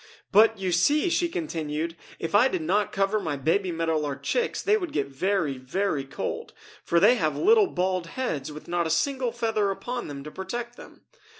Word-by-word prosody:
"But, 220 +2 +6
you 190 -2 -2
see," 290 - +3
she 345 0 +1
continued, 160 - -3 0.2
"if 165 - -5
I 215 +6 +6
did 335 +4 -2
not 210 -9 +1
cover 200 +2 +1
my 160 -7 -3
baby 175 +7 +1
Meadow 165 -1 0
Lark 145 -2 -4
chicks 485 -1 0
they 420 - +3
would 360 -6 -3
get 140 - 0
very, 145 0 -1
very 145 +2 -1
cold, 135 - -5 0.3
for 170 - +2
they 220 +7 +6
have 155 -6 0
little 430 +1 +5
bald 185 - -1
heads 155 - -3
with 150 +1 -10
not 175 -1 0
a - - -3
single 260 - 0
feather 225 -3 0
upon 240 +5 -4
them 140 -2 -7
to 150 - -8
protect 235 +7 -5
them! - - -14
190 Hz, 195 wpm, -26 LUFS, 155-240 Hz, 0.3 s, But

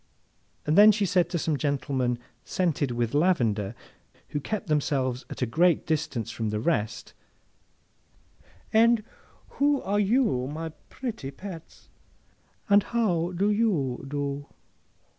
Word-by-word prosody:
Then, 205 +8 +7
she 210 -1 0
said 180 -1 +2
to 175 - -1
some 155 -2 0
gentlemen 135 -4 -1 0.3
scented 160 -6 0
with 120 0 -1
lavender, 120 - +1 0.5
who 145 - -2
kept 210 +8 -4
themselves 135 -5 0
at - - -4
a - - +3
great 165 +8 +2
distance 130 -7 -2
from 115 -2 -3
the 105 0 -2
rest, 115 -4 -1 1.6
'And 230 0 +5 0.6
who 285 0 +3
are 205 +2 0
you, 205 - +2
my 160 +3 -5 0.2
pretty 225 - -5
pets, 170 +2 -10 0.8
and 205 -1 +6
how 185 -7 0
do 200 +4 +1
you 180 - 0
do? 140 0 -3
155 Hz, 120 wpm, -27 LUFS, 130-200 Hz, 1.6 s, Then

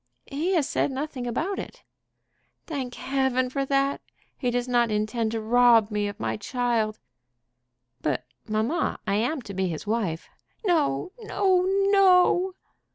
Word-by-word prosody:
"He 325 +7 -1
has 310 -5 +2
said - - 0
nothing 265 -2 -4
about 330 - -2
it." - - -9 0.8
"Thank 265 -6 -4
Heaven 265 -2 0
for 275 0 -1
that! 275 0 +1 0.3
He 250 - -1
does 245 +1 -1
not 240 -2 +2
intend 215 +2 -1
to 225 - -1
rob 230 -1 +4
me 210 0 0
of 205 - -7
my - - -2
child." 225 -1 -1 1.0
"But, 145 -4 -1 0.2
mamma, 220 +9 0
I - - 0
am 250 +5 -1
to 200 - -8
be 190 0 0
his 165 0 -5
wife." 205 -7 -2 0.4
"No, 330 - +1
no, 380 -4 +1 0.2
no!" 370 -1 +5
245 Hz, 145 wpm, -26 LUFS, 215-295 Hz, 1.0 s, no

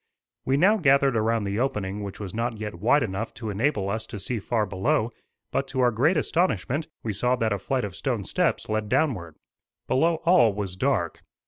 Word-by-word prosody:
We 135 +1 +2
now 200 +8 +5
gathered 140 - +4
around 115 0 +1
the 100 +2 -2
opening 105 -6 -2
which 100 -1 -6
was 100 -4 -6
not 115 0 -2
yet 105 -1 -5
wide 125 +8 +3
enough 110 +1 -4
to 110 -1 -5
enable 105 -1 0
us 110 +3 -3
to 105 - -7
see 115 +5 -3
far 110 +1 0
below; 100 +4 0 0.4
but 135 - -1
to 130 - -4
our 125 -1 +4
great 145 +11 +2
astonishment 155 - 0 0.2
we 110 - -2
saw 125 +5 +1
that 115 -4 0
a 100 - -2
flight 130 +6 -1
of 95 -3 -7
stone - - -2
steps - - 0
led 110 -1 -2
downward. 110 - 0 0.5
Below 165 +5 +3
all 170 - +5
was 100 -3 -3
dark. 95 - 0
115 Hz, 200 wpm, -25 LUFS, 100-135 Hz, 0.5 s, now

